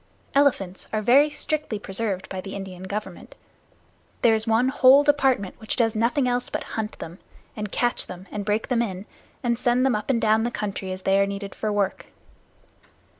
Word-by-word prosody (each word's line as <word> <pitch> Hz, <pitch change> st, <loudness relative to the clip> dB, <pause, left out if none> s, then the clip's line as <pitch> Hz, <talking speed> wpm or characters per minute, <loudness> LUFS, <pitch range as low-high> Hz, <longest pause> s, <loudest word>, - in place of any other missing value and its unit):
Elephants 240 Hz, -10 st, +1 dB
are 215 Hz, -1 st, -1 dB
very 275 Hz, +7 st, +5 dB
strictly 300 Hz, -6 st, -2 dB
preserved 195 Hz, -1 st, -3 dB
by 190 Hz, -, -5 dB
the 195 Hz, +1 st, -7 dB
Indian 190 Hz, -2 st, -7 dB
Government. 210 Hz, +3 st, -6 dB, 0.9 s
There 230 Hz, -, +6 dB
is 220 Hz, +1 st, 0 dB
one 225 Hz, +3 st, +3 dB
whole 265 Hz, +1 st, +6 dB
department 270 Hz, -9 st, +2 dB
which 220 Hz, -, -2 dB
does 225 Hz, -2 st, +1 dB
nothing 245 Hz, +5 st, +1 dB
else 245 Hz, 0 st, 0 dB
but -, -, -3 dB
hunt 215 Hz, -1 st, -3 dB
them, 170 Hz, +3 st, -9 dB, 0.4 s
and 210 Hz, -2 st, -5 dB
catch 240 Hz, 0 st, 0 dB
them, 185 Hz, +1 st, -9 dB
and 210 Hz, -, -4 dB
break 210 Hz, +2 st, -1 dB
them 245 Hz, -2 st, +2 dB
in, 195 Hz, -4 st, -4 dB, 0.4 s
and 235 Hz, -1 st, 0 dB
send 250 Hz, 0 st, +2 dB
them 265 Hz, -, +2 dB
up 210 Hz, +4 st, -4 dB
and 250 Hz, -3 st, +2 dB
down 220 Hz, 0 st, +3 dB
the 235 Hz, -, 0 dB
country 200 Hz, -4 st, -4 dB
as 185 Hz, 0 st, -6 dB
they 195 Hz, 0 st, +3 dB
are 200 Hz, -, +3 dB
needed 200 Hz, 0 st, -5 dB
for 215 Hz, -, -2 dB
work. 200 Hz, -2 st, -1 dB
220 Hz, 190 wpm, -24 LUFS, 195-245 Hz, 0.9 s, There